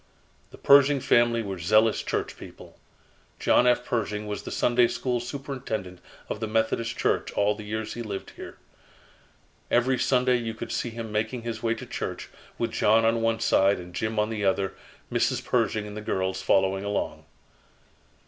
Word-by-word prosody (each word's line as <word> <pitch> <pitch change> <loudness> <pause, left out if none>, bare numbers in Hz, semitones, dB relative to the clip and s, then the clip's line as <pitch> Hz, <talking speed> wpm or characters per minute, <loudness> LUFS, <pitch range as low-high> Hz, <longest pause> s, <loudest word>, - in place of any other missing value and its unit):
"The - - -14
Pershing 140 0 +6
family 120 -2 +3
were 95 -3 -5
zealous 110 +6 +3
church - - -3
people. - - -13 0.6
John 125 - +4
F. 125 0 +3
Pershing 105 -2 -2
was 105 -1 -4
the - - -8
Sunday 120 0 +3
School 125 0 -2
superintendent 120 -8 -5 0.3
of - - -4
the 110 - -2
Methodist 115 +1 0
Church - - 0
all 105 +1 +2
the 105 0 -9
years 110 +1 -4
he 120 - -6
lived 100 -4 -6
here. - - -10 1.1
Every 125 +1 +2
Sunday 125 -1 +3
you 115 -2 -4
could - - -6
see 120 - -2
him 115 -1 -7
making 110 +3 -2
his 115 -2 -4
way 115 0 0
to - - -8
church - - -5 0.3
with - - -1
John 110 +2 +3
on 115 0 +2
one 115 0 +1
side 100 -3 +3
and 90 0 -10
Jim 110 +4 -2
on 105 +1 +1
the 105 -2 -3
other, 95 0 +1 0.4
Mrs. - - 0
Pershing 110 -1 0
and 105 0 -8
the 110 - -5
girls 95 -2 -2
following 95 0 +2
along." 100 0 -3
110 Hz, 175 wpm, -26 LUFS, 105-120 Hz, 1.1 s, Pershing